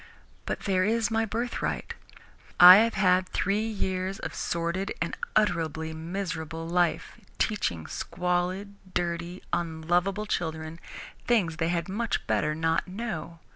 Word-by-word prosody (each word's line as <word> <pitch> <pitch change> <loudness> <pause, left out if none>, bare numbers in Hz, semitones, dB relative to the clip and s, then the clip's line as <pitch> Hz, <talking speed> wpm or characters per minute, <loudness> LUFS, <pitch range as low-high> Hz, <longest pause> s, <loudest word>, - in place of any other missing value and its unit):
But - - -2
there 185 -2 +1
is 225 +2 +1
my 225 0 +2
birthright. 230 +3 -3 0.7
I 180 +1 +12
have 230 +2 +3
had 185 -1 +3
three 205 +3 0
years 190 -3 -2
of 160 -8 -6
sordid 170 +6 -2
and 170 - -2 0.2
utterly 160 -5 +1
miserable 165 -1 -4
life, 175 0 0 0.2
teaching 95 - -1
squalid, 180 - -2 0.2
dirty, 170 +1 -2
unlovable 175 +4 0
children 160 -4 -3 0.5
things 185 -10 +2
they 165 0 0
had 170 +1 -1
much 210 +3 -2
better 150 0 +1
not 165 +2 0
know. 180 -5 -5
180 Hz, 125 wpm, -27 LUFS, 165-200 Hz, 0.7 s, I